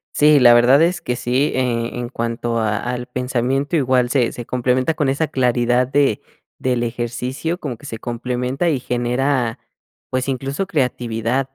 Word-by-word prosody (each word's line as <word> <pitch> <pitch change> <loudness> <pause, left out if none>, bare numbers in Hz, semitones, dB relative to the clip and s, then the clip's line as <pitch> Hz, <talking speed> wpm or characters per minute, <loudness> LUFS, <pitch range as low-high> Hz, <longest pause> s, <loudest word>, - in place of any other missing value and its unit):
Sí, 150 0 +5
la 120 -2 +7
verdad 125 +5 +5
es 175 +2 +2
que 125 - -2
sí, 125 +5 0
eh, 120 -2 -1
en 120 -1 -4
cuanto 115 -1 -2
a 105 -1 0
al 125 0 -4
pensamiento, 125 +4 -1
igual 130 -4 +2
se 125 -3 +2
se 120 - -7
complementa 125 +5 0
con 150 -3 0
esa 140 +4 0
claridad 125 -2 +1
de 135 -4 +1 0.4
del 125 -2 0
ejercicio, 125 +7 -3
como 130 -9 -5
que 145 - -15
se 115 -5 -6
complementa 125 +6 -2
y 145 -5 0
genera, 125 0 -1 0.5
pues, 130 0 -1
incluso 135 +6 -2
creatividad, 125 -4 -1
125 Hz, 160 wpm, -20 LUFS, 120-135 Hz, 0.5 s, la